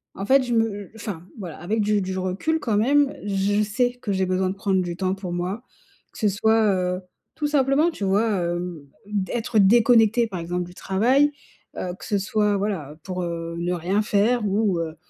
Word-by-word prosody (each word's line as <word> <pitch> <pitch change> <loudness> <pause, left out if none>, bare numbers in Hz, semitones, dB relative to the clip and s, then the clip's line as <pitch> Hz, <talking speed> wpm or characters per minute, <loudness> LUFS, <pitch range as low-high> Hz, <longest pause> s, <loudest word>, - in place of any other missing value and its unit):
en 195 - -4
fait, 265 +3 +5
je 245 - -2
me 225 -1 +4 0.2
heu, - - -16
enfin, 195 -6 -7
voilà, 180 -6 -7
avec 210 +6 -1
du 210 0 +2
du 190 0 -3
recul 190 +13 -1
quand 220 -6 0
même, 280 +5 +3
je 205 +1 +1
sais 245 +4 +1
que 205 - -2
j'ai 190 0 +1
besoin 185 0 0
de 190 - -4
prendre 195 -2 +1
du 175 -1 -4
temps 185 +1 -1
pour 190 -3 -5
moi 185 +6 -3 0.5
que - - -11
ce 215 - +3
soit, 220 +1 +3
heu, 180 0 -1 0.3
tout 300 -1 -1
simplement, 290 +3 +3
tu 205 -11 -4
vois? 205 +4 +2 0.2
Hem, 175 -4 -4 0.2
d'être 210 +2 -1
déconnectée, 225 +2 +5
par 190 -5 -5
exemple 175 +2 -2
du 175 0 -11
travail, 250 +12 +2 0.5
heu, 180 -1 -3
que - - -9
ce 205 - 0
soit, 210 +1 +1
voilà, 190 -8 -3
pour, 185 -1 -4
heu, 170 -1 -4
ne 175 +1 -1
rien 180 +5 0
faire 210 +2 +2
ou, 200 -3 +1
heu, 160 -1 -4
200 Hz, 205 wpm, -23 LUFS, 180-225 Hz, 0.5 s, fait